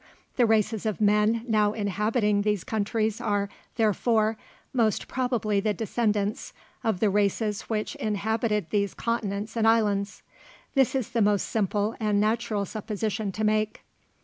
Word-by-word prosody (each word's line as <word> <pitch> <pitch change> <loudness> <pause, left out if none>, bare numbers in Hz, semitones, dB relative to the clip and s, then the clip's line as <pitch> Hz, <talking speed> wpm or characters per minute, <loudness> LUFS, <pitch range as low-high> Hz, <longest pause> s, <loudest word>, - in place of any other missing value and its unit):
The 245 -3 +4
races 220 0 +1
of 215 - -2
men 210 +2 +3
now 210 -2 +2
inhabiting 210 +1 +1
these 210 -2 0
countries 220 -2 -1
are, 200 -1 0 0.3
therefore, 220 0 +2 0.4
most 225 -5 +1
probably 240 -5 0
the 210 +1 0
descendants 210 -2 -1 0.3
of 220 -5 0
the 215 - +4
races 205 +1 0
which 215 -1 -1
inhabited 215 -2 -1
these 200 -2 0
continents 215 -2 -2
and 225 -1 +2
islands. 205 -3 +1 0.5
This 270 -2 +3
is 260 -5 -1
the 230 -2 +1
most 205 -1 +3
simple 210 0 0
and 210 -2 +1
natural 215 -1 0
supposition 215 0 -3
to 215 +3 -4
make. 215 0 0
215 Hz, 140 wpm, -26 LUFS, 205-225 Hz, 0.5 s, The